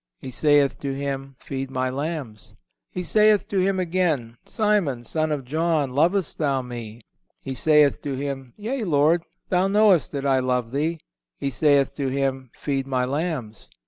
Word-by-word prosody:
He 130 - -8
saith 145 0 +3
to 140 -1 -3
him: 135 -1 -4
Feed 135 -1 -5
My 130 -1 -1
lambs. 140 - -5 0.3
He 180 - -4
saith 210 +3 +3
to 195 - 0
him 190 0 +1
again: 165 -10 0
Simon, 195 - 0
son 155 +4 -1
of 140 -4 -2
John, 155 -1 0
lovest 175 +5 +1
thou 140 -4 +1
Me? 120 -2 -8 0.4
He 135 - -4
saith 150 +2 +4
to 145 - -3
Him: 135 -2 -5
Yea, 235 +4 -3
Lord, 160 -1 +3 0.3
Thou 185 +1 +2
knowest 200 -4 +4
that 140 -1 -3
I 135 -1 +3
love 125 -2 -1
Thee. 155 +4 -1 0.4
He 140 - -3
saith 140 +1 +3
to 140 -2 -1
him: 135 -1 -1
Feed 135 -2 -2
My 130 -2 0
lambs. 140 - -4
140 Hz, 165 wpm, -24 LUFS, 130-165 Hz, 0.4 s, saith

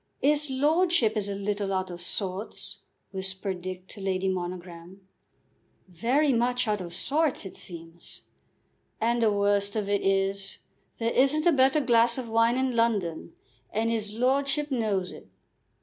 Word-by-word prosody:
"'Is 295 +1 +3
lordship 295 -3 +2
is 205 -2 -2
a 200 - -2
little 200 0 -2
out 185 -1 -1
of 175 0 -7
sorts," 190 +3 -2 0.3
whispered 190 -1 -3
Dick 185 0 -6
to 205 - -10
Lady 190 0 -1
Monogram. 180 0 -5 0.8
"Very 250 - +1
much 245 +1 +1
out 210 -2 0
of 175 -1 -7
sorts, 280 - 0
it 190 - -8
seems." 165 -1 -8 0.8
"And 235 +1 +1
the 220 -2 +4
worst 200 0 +1
of 210 -2 -1
it 200 -1 +1
is, 195 0 0 0.4
there 230 0 -1
isn't 275 +4 +3
a 345 - +6
better 270 +1 +4
glass 235 -2 +3
of 255 -2 -4
wine 230 +2 +3
in 260 -2 0
London, 200 -9 0 0.4
and 225 +1 0
'is 215 -2 -1
lordship 275 +5 +1
knows 205 -7 0
it." - - -12
210 Hz, 150 wpm, -27 LUFS, 190-250 Hz, 0.8 s, a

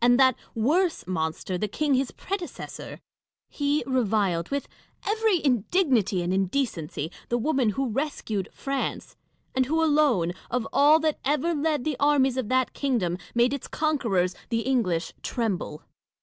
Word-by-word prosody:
and 245 +1 +5
that 260 -2 +6 0.2
worse 320 +10 +1
monster, 175 +1 -2
the 210 - 0
king 290 +7 0
his 265 0 +2
predecessor 380 -2 -6 0.3
% - - -67
He 290 +1 +2
reviled, 205 -9 +1
with 280 0 -2 0.4
every 425 -6 +2
indignity 245 - +2
and 175 +2 -1
indecency, 190 - -1 0.2
the 240 - +1
woman 260 -2 +1
who 270 -1 +1
rescued 225 -6 -2
France; 275 -1 -3 0.4
and 260 -1 +1
who 320 +3 +2
alone, 290 - +3 0.2
of 245 -2 -1
all 300 +3 +6
that 310 -1 0
ever 300 +4 +1
led 300 -3 0
the 305 -4 -1
armies 280 -3 +3
of 245 -5 -2
that 260 0 +1
kingdom, 235 -11 0 0.2
made 240 +2 +3
its 280 - -4
conquerors 230 - 0
— - - -30
the 230 -1 0
English 220 -10 0
— - - -35
tremble. 200 -10 -2
260 Hz, 155 wpm, -26 LUFS, 205-295 Hz, 0.4 s, that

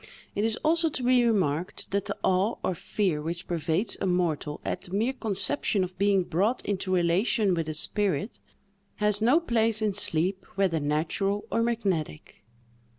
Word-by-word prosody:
It 205 - -1
is 225 +1 +1
also 325 +1 +3
to 260 -4 -4
be 250 0 +4
remarked 185 -8 0
that 200 0 0
the - - -4
awe 190 +5 +2
or 185 - 0
fear 175 -2 -1
which 170 +3 -4
pervades 170 +4 -1
a - - 0
mortal 165 -5 -1
at 185 - -2
the 180 - -9
mere 230 +6 +1
conception 220 -2 +1
of 185 0 -7
being 200 -2 +3
brought 200 +9 0
into 195 -2 -2
relation 185 +4 +2
with 165 -2 -2
a 155 - -2
spirit, 205 +5 -1 0.6
has 210 0 +1
no 250 +9 +5
place 230 -8 +1
in 215 -2 0
sleep, 185 +3 0
whether 190 -5 +1
natural 160 +8 -1
or 230 - +1
magnetic. 195 - -2
195 Hz, 165 wpm, -27 LUFS, 175-220 Hz, 0.6 s, no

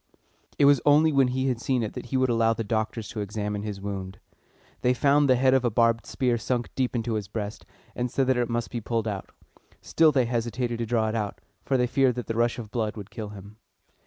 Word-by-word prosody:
It 140 - +4
was 140 -2 +5
only 150 +2 +5
when 135 -3 +4
he 130 +1 -1
had 125 -3 -1
seen 125 -1 0
it 110 - -4
that - - -7
he 130 - -1
would 130 -1 +2
allow 115 -1 +3
the 115 - -3
doctors 110 0 -2
to 115 - -6
examine 105 0 -3
his 105 -2 -5
wound. 95 -1 -5 0.6
They 125 0 +2
found 140 +3 +3
the 130 - +6
head 130 +1 +3
of 130 -1 +3
a 120 - +2
barbed 115 0 +2
spear 125 -3 0
sunk 120 +1 -2
deep 130 -1 -1
into 115 0 -1
his 105 -3 -2
breast, 105 0 -6 0.3
and 125 0 -1
said 135 +2 +1
that 130 -1 +2
it 120 -1 0
must 120 0 -2
be 120 - -3
pulled 115 0 -2
out. 100 -3 -4 0.5
Still 160 -1 +3
they 130 -4 +2
hesitated 120 0 -2
to 115 - -2
draw 110 -1 +1
it 110 - -3
out, 105 -3 -3 0.3
for 135 - +2
they 125 - +2
feared 130 0 +2
that 125 - -4
the 115 - -3
rush 120 0 +1
of 110 -4 -8
blood 110 -2 -2
would 105 0 -9
kill 110 -2 -6
him. 100 +1 -12
120 Hz, 245 wpm, -26 LUFS, 110-130 Hz, 0.6 s, the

